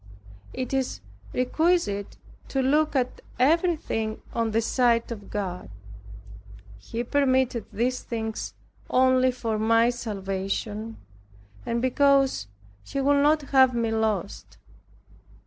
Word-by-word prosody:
It 255 Hz, +1 st, -4 dB
is 265 Hz, -1 st, -1 dB, 0.3 s
requisite 255 Hz, -, 0 dB, 0.3 s
to 270 Hz, -1 st, -1 dB
look 300 Hz, +3 st, +2 dB
at 255 Hz, -1 st, -1 dB, 0.2 s
everything 295 Hz, -7 st, +1 dB
on 230 Hz, -1 st, 0 dB
the 220 Hz, +1 st, +1 dB
side 235 Hz, 0 st, +2 dB
of 210 Hz, -3 st, -7 dB
God. 185 Hz, -, -4 dB, 1.1 s
He 230 Hz, -, -4 dB
permitted 260 Hz, -3 st, +1 dB
these 250 Hz, +4 st, -1 dB
things 220 Hz, -2 st, -4 dB, 0.3 s
only 255 Hz, 0 st, +4 dB
for 230 Hz, -3 st, -3 dB
my 230 Hz, +2 st, +4 dB
salvation, 210 Hz, 0 st, -4 dB, 0.7 s
and 235 Hz, +1 st, -1 dB
because 275 Hz, -, +3 dB, 0.4 s
He 275 Hz, -, -4 dB
would 280 Hz, +1 st, +3 dB
not 300 Hz, +1 st, +3 dB
have 260 Hz, -2 st, +6 dB
me 230 Hz, -1 st, 0 dB
lost. 215 Hz, -4 st, -2 dB
240 Hz, 110 wpm, -26 LUFS, 220-265 Hz, 1.1 s, have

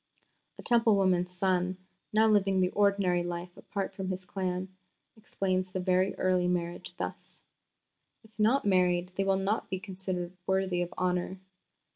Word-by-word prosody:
A -, -, -10 dB
Temple 230 Hz, -3 st, +4 dB
woman's 180 Hz, -2 st, +2 dB
son, 180 Hz, 0 st, 0 dB, 0.3 s
now 220 Hz, +1 st, +4 dB
living 195 Hz, -3 st, +3 dB
the 180 Hz, 0 st, +2 dB
ordinary 200 Hz, -3 st, +2 dB
life 175 Hz, 0 st, -5 dB
apart 195 Hz, -1 st, -4 dB
from 190 Hz, -1 st, -4 dB
his 185 Hz, 0 st, -4 dB
clan, 185 Hz, 0 st, -3 dB, 0.5 s
explains 185 Hz, -4 st, -2 dB
the 185 Hz, -, -2 dB
very 185 Hz, +1 st, +2 dB
early 185 Hz, -1 st, +2 dB
marriage 175 Hz, -1 st, -2 dB
thus: -, -, -7 dB, 0.8 s
"If 220 Hz, -, -19 dB
not 230 Hz, +5 st, +3 dB
married, 180 Hz, -2 st, +2 dB
they 195 Hz, -, +1 dB
will 195 Hz, 0 st, +2 dB
not 195 Hz, +3 st, -1 dB
be 190 Hz, -, -2 dB
considered 185 Hz, -2 st, -5 dB
worthy 190 Hz, -2 st, +1 dB
of 175 Hz, 0 st, -3 dB
honour. 180 Hz, +1 st, -1 dB
185 Hz, 150 wpm, -30 LUFS, 180-195 Hz, 0.8 s, Temple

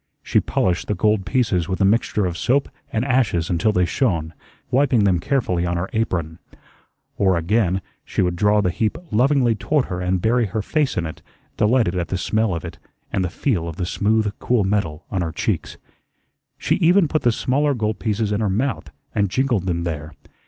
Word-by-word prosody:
She -, -, +2 dB
polished 90 Hz, -2 st, 0 dB
the 105 Hz, -, 0 dB
gold 105 Hz, 0 st, +1 dB
pieces 100 Hz, -9 st, +1 dB
with 95 Hz, -, -2 dB
a 100 Hz, -, +4 dB
mixture 105 Hz, -1 st, +2 dB
of 90 Hz, -2 st, -2 dB
soap 135 Hz, -, +1 dB, 0.2 s
and 110 Hz, +3 st, -1 dB
ashes 110 Hz, -, +1 dB
until 90 Hz, +5 st, +2 dB
they 90 Hz, -3 st, +2 dB
shone, 85 Hz, -, -1 dB, 0.4 s
wiping 130 Hz, -4 st, +3 dB
them 95 Hz, -3 st, +3 dB
carefully 95 Hz, -7 st, 0 dB
on 85 Hz, 0 st, -1 dB
her 85 Hz, +2 st, -3 dB
apron. 90 Hz, -7 st, -2 dB, 0.8 s
Or, 95 Hz, -3 st, +3 dB
again, 95 Hz, +1 st, +1 dB, 0.2 s
she -, -, -1 dB
would 90 Hz, -1 st, 0 dB
draw 105 Hz, +2 st, +3 dB
the 90 Hz, -3 st, +1 dB
heap 110 Hz, +4 st, -1 dB
lovingly 125 Hz, +1 st, +3 dB
toward 145 Hz, +5 st, 0 dB
her 90 Hz, 0 st, -4 dB
and 90 Hz, +1 st, 0 dB
bury 115 Hz, +4 st, +2 dB
her 105 Hz, +2 st, -3 dB
face 150 Hz, 0 st, 0 dB
in 85 Hz, -, 0 dB
it, 80 Hz, -, -7 dB, 0.3 s
delighted 110 Hz, -4 st, +2 dB
at 85 Hz, -2 st, -1 dB
the 95 Hz, -, -2 dB
smell 110 Hz, 0 st, 0 dB
of 85 Hz, -, -5 dB
it 80 Hz, -2 st, -8 dB, 0.3 s
and 95 Hz, -, +1 dB
the 90 Hz, -, -1 dB
feel 90 Hz, -, -1 dB
of 80 Hz, -, -6 dB
the 90 Hz, -, -2 dB
smooth, 105 Hz, +2 st, +1 dB
cool 120 Hz, -4 st, +1 dB
metal 90 Hz, -6 st, -1 dB
on 95 Hz, -, -1 dB
her 85 Hz, -2 st, -2 dB
cheeks. -, -, -2 dB, 0.8 s
She -, -, 0 dB
even 180 Hz, +1 st, +4 dB
put 155 Hz, +1 st, 0 dB
the 120 Hz, -3 st, +3 dB
smaller 140 Hz, +5 st, +1 dB
gold 110 Hz, -2 st, -2 dB
pieces 110 Hz, -1 st, -1 dB
in 105 Hz, +1 st, 0 dB
her 105 Hz, -, +1 dB
mouth, 110 Hz, -, -1 dB, 0.2 s
and 100 Hz, -2 st, +1 dB
jingled 120 Hz, -5 st, 0 dB
them 85 Hz, -1 st, -1 dB
there. 80 Hz, -2 st, -4 dB
100 Hz, 200 wpm, -21 LUFS, 90-120 Hz, 0.8 s, a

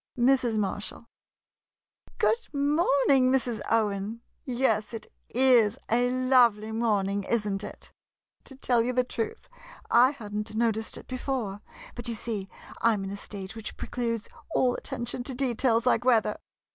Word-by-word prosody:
Mrs. 245 Hz, -2 st, +3 dB
Marshall 210 Hz, +2 st, -3 dB, 1.1 s
Good 470 Hz, +1 st, +1 dB
morning, 280 Hz, -3 st, +3 dB
Mrs. 245 Hz, -4 st, 0 dB
Owen. 215 Hz, 0 st, 0 dB, 0.2 s
Yes, 240 Hz, -3 st, 0 dB
it 220 Hz, -, -7 dB, 0.2 s
is 240 Hz, -4 st, +4 dB
a 245 Hz, +2 st, +3 dB
lovely 250 Hz, -4 st, +3 dB
morning, 205 Hz, -3 st, 0 dB
is 215 Hz, 0 st, 0 dB
n't 195 Hz, 0 st, -2 dB
it? -, -, -10 dB, 0.5 s
To 270 Hz, -, -11 dB
tell 245 Hz, -3 st, +2 dB
you 245 Hz, +2 st, -1 dB
the 250 Hz, 0 st, +3 dB
truth, 445 Hz, -, -5 dB, 0.4 s
I 245 Hz, +2 st, +7 dB
had 220 Hz, -8 st, -9 dB
n't 210 Hz, +1 st, -3 dB
noticed 225 Hz, -1 st, 0 dB
it -, -, -11 dB
before, 250 Hz, -6 st, -3 dB, 0.3 s
but 240 Hz, -1 st, -7 dB
you 235 Hz, -, -2 dB
see 210 Hz, -3 st, -4 dB, 0.3 s
I 230 Hz, 0 st, +4 dB
'm 200 Hz, -2 st, -3 dB
in 195 Hz, -, -5 dB
a -, -, -4 dB
state 200 Hz, -1 st, -8 dB
which 225 Hz, -1 st, -7 dB
precludes 230 Hz, -3 st, -3 dB, 0.3 s
all 250 Hz, -1 st, +3 dB
attention 245 Hz, -2 st, -4 dB
to 260 Hz, 0 st, -5 dB
details 245 Hz, -2 st, +1 dB
like 245 Hz, -1 st, +3 dB
weather 245 Hz, -3 st, +2 dB
235 Hz, 150 wpm, -27 LUFS, 215-255 Hz, 1.1 s, I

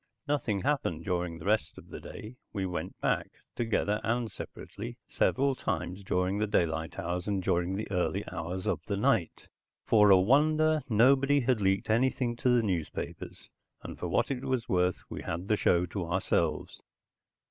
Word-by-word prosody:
Nothing 120 Hz, -9 st, 0 dB
happened 135 Hz, -, -1 dB
during 90 Hz, -2 st, -1 dB
the -, -, -10 dB
rest 110 Hz, +2 st, +1 dB
of -, -, -13 dB
the -, -, -7 dB
day. 110 Hz, +4 st, -9 dB, 0.2 s
We 100 Hz, -3 st, -2 dB
went 90 Hz, -2 st, -5 dB
back, -, -, 0 dB, 0.3 s
together 105 Hz, -2 st, 0 dB
and 115 Hz, -1 st, -1 dB
separately, 115 Hz, +4 st, -8 dB
several 135 Hz, +1 st, +2 dB
times 95 Hz, -6 st, -3 dB
during 95 Hz, +2 st, 0 dB
the 105 Hz, -, +1 dB
daylight 80 Hz, -5 st, 0 dB
hours 90 Hz, +2 st, -3 dB
and 100 Hz, -2 st, -1 dB
during 90 Hz, 0 st, +1 dB
the 105 Hz, -, -3 dB
early 90 Hz, -4 st, 0 dB
hours 90 Hz, +3 st, -4 dB
of -, -, -1 dB
the -, -, -1 dB
night. -, -, 0 dB, 0.4 s
For 105 Hz, -2 st, +5 dB
a 95 Hz, -, +8 dB
wonder, 155 Hz, +8 st, +3 dB
nobody 135 Hz, +5 st, +4 dB
had 125 Hz, -3 st, +1 dB
leaked 95 Hz, +2 st, +1 dB
anything 120 Hz, +1 st, +1 dB
to 125 Hz, -, +1 dB
the 120 Hz, -2 st, +4 dB
newspapers, 90 Hz, -7 st, -4 dB, 0.3 s
and -, -, -8 dB
for -, -, -3 dB
what -, -, +1 dB
it 130 Hz, -1 st, -3 dB
was 130 Hz, -2 st, -1 dB
worth, 90 Hz, -4 st, +1 dB
we -, -, -6 dB
had 85 Hz, +4 st, -4 dB
the 105 Hz, -, +3 dB
show 90 Hz, -3 st, +2 dB
to 90 Hz, -1 st, -4 dB
ourselves. 85 Hz, -3 st, -1 dB
105 Hz, 170 wpm, -30 LUFS, 90-125 Hz, 0.4 s, a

